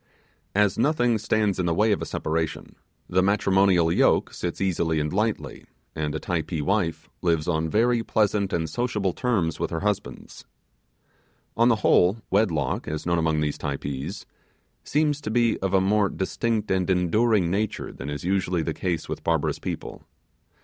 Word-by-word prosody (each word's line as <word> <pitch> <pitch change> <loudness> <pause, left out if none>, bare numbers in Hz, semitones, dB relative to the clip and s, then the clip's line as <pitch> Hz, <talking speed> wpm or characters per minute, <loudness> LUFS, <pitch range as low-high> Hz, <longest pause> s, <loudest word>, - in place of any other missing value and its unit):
As 105 -1 +2
nothing 120 -6 +2
stands 105 -2 0
in 90 - 0
the 85 - +1
way 105 +4 +3
of 100 - 0
a - - -4
separation, 80 0 -3 0.3
the 95 +1 +2
matrimonial 95 -3 +3
yoke - - +2
sits 85 -1 -4
easily 85 -4 0
and 75 +2 -2
lightly, 105 +2 -2 0.3
and 75 -1 -2
a - - -2
Typee 80 -1 -2
wife 85 +1 -1
lives 80 -3 +1
on 80 -2 0
very 115 +5 +2
pleasant 105 -3 +1
and 80 -1 -1
sociable 105 -4 -1
terms 95 - -1
with - - -1
her 80 - -3
husband. 105 -1 -4 1.1
On 115 +2 +4
the 115 - +4
whole, 90 +5 +4
wedlock, 85 -10 +1
as 75 +1 -4
known 85 -1 +1
among 80 -1 +1
these 75 -1 -2
Typees, 70 +5 -4 0.6
seems 150 0 0
to 110 - -4
be 115 0 +2
of 95 -1 -1
a 95 - +4
more 100 +1 +2
distinct 110 +3 -2
and 95 -1 +1
enduring 95 +1 +2
nature 105 +2 -2
than 70 - -7
is 75 -1 -5
usually 90 -2 0
the 80 - -2
case 85 -2 -3
with - - -5
barbarous - - 0
people. - - -6
95 Hz, 165 wpm, -25 LUFS, 80-105 Hz, 1.1 s, On